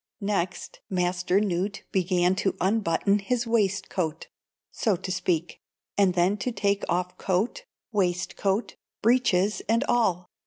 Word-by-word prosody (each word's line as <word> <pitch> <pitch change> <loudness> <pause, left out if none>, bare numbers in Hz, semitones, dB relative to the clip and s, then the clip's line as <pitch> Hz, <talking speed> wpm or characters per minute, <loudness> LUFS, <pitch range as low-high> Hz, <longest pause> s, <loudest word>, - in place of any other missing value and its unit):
Next, 195 -4 -2
Master 180 0 +1
Newt 200 0 -1
began 180 -1 +2
to 200 -1 0
unbutton 200 0 +2
his 240 +4 -1
waistcoat, 195 -7 -1 0.4
so 215 -5 +1
to 185 - -5
speak, 180 -3 -1 0.3
and 195 -3 +3
then 180 +4 +3
to 250 +5 -2
take 200 -2 0
off 180 +1 -1
coat, 200 - -1 0.3
waistcoat, 195 +1 -1 0.3
breeches 210 -4 +3
and 230 +3 +3
all. 190 -9 +1
190 Hz, 120 wpm, -26 LUFS, 180-210 Hz, 0.4 s, and